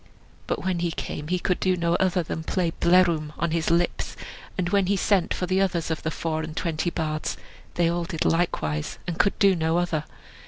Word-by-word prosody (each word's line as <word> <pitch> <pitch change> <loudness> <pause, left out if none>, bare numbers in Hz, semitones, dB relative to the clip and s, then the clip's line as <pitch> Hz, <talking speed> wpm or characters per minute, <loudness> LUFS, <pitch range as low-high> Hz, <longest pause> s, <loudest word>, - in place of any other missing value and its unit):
But - - -2
when 185 -2 0
he 170 0 0
came 150 -2 -5
he 180 +2 +1
could 180 0 0
do 185 -1 +2
no 170 0 +1
other 185 -1 +2
than 160 - -4
play 175 0 0
"Blerwm!" 170 -4 +3
on 170 - 0
his 165 -1 0
lips; 170 +1 0 0.4
and 180 -2 0
when 200 -1 +2
he 200 +1 +2
sent 190 -2 +2
for 180 - -1
the 185 +2 +1
others 175 -4 0
of 160 - -2
the 160 - -1
four 160 0 -2
and 155 0 -7
twenty 165 0 0
bards, 155 -2 -2 0.4
they 175 -1 +3
all 170 0 0
did 165 -2 -2
likewise, 75 - 0
and 175 -2 -4
could 200 - +3
do 195 -2 +5
no 160 0 +1
other. 165 -3 0
170 Hz, 210 wpm, -25 LUFS, 160-185 Hz, 0.4 s, do